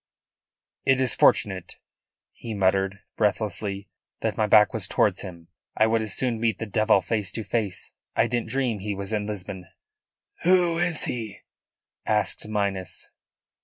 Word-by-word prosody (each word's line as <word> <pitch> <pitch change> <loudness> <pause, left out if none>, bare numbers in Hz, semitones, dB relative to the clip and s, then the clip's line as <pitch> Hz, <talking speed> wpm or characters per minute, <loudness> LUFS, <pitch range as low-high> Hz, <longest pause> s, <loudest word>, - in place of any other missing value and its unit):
"It 135 -1 +3
is 130 -3 +3
fortunate," 95 -4 +2 0.6
he 115 -2 -7
muttered 95 0 +1 0.2
breathlessly, 105 -1 -1 0.3
"that - - -1
my 110 - +1
back 105 0 +6
was 105 -4 -1
towards 95 -1 +1
him. 85 -4 -10 0.3
I 110 - +5
would 110 0 +2
as 110 -3 -3
soon 120 -4 -1
meet 110 -3 +1
the 110 - -4
devil 110 -1 +3
face 105 0 -1
to 115 - -3
face. 100 -3 -2 0.2
I - - +4
didn't 120 -1 -2
dream 130 -5 0
he 100 +1 -3
was 100 +2 -4
in 105 -1 -1
Lisbon." 95 -3 -5 0.7
"Who 175 -2 +3
is 175 -2 +2
he?" 110 -4 -4 0.7
asked 105 0 +1
Minas. 100 -4 -2
105 Hz, 150 wpm, -25 LUFS, 95-115 Hz, 0.7 s, back